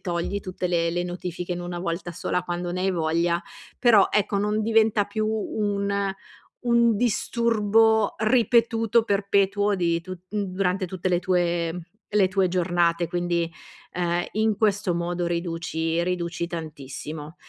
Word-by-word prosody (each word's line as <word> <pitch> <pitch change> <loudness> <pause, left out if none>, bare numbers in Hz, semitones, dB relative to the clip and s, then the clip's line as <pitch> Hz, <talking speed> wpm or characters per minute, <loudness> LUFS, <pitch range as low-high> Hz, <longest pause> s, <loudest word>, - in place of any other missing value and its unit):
togli 175 +2 -2
tutte 185 -1 -4
le 170 -1 +1
le 175 +1 -1
notifiche 180 0 -5
in 175 - -4
1 175 0 -5
volta 175 0 -3
sola 180 - -2
quando 175 0 -3
ne 180 +1 -2
hai 190 - +2
voglia. 170 +1 0 0.4
Però, 225 -6 +6
ecco, 205 -1 +1
non 210 +2 0
diventa 220 -1 +3
più 215 +2 -2
un 205 -2 -1 0.7
un 235 -2 +4
disturbo 220 -1 +2
ripetuto, 230 0 +3
perpetuo 200 0 +1
di 170 -3 +1
tutt 185 +1 -10
m 205 -1 0
durante 185 0 -1
tutte 185 +1 -3
le 175 -1 +2
tue 175 -2 0 0.3
le 200 -3 +4
tue 190 0 +2
giornate, 175 -1 +1
quindi, 175 -1 -1 0.5
uhm, 175 0 0
in 215 0 +1
questo 200 -4 +1
modo 175 +1 -2
riduci 165 -1 -2
riduci 170 -1 -2
tantissimo, 155 -1 -7
180 Hz, 140 wpm, -25 LUFS, 170-210 Hz, 0.7 s, Però